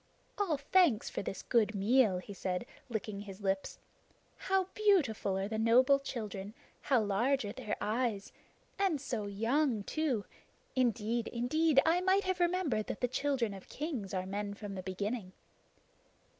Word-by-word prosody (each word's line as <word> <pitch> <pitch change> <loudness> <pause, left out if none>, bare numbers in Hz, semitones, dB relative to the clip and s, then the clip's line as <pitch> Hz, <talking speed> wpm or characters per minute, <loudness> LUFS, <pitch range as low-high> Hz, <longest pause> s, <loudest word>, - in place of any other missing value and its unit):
"All 355 -8 +1
thanks 285 - +3
for - - -3
this 195 -1 -5
good 220 -2 +2
meal," 210 0 +4
he 190 +3 -7
said, 185 +2 -3 0.2
licking 215 -3 -3
his 200 -1 -9
lips. 195 -1 -1 0.6
"How 385 0 +1
beautiful 295 - +2
are 195 +1 -1
the 220 +1 -3
noble 255 +5 +5
children! 215 -6 -6 0.3
How 265 -4 +3
large 225 +5 +1
are 205 - -3
their 240 -4 -3
eyes! 220 -2 -1 0.5
And 380 -7 +2
so 235 -6 -3
young 225 +3 +1
too! 270 -6 -1 0.5
Indeed, 235 -2 +1
indeed, 275 +5 +2
I 335 +3 +3
might 380 +2 +3
have 370 -1 -1
remembered 345 - +1
that - - -5
the 250 - +3
children 255 -4 0
of 195 -1 -11
kings 270 - -4
are 185 -1 -2
men 200 +1 -3
from 205 -1 -7
the 190 - -5
beginning." 195 +1 -4
230 Hz, 155 wpm, -33 LUFS, 200-280 Hz, 0.6 s, noble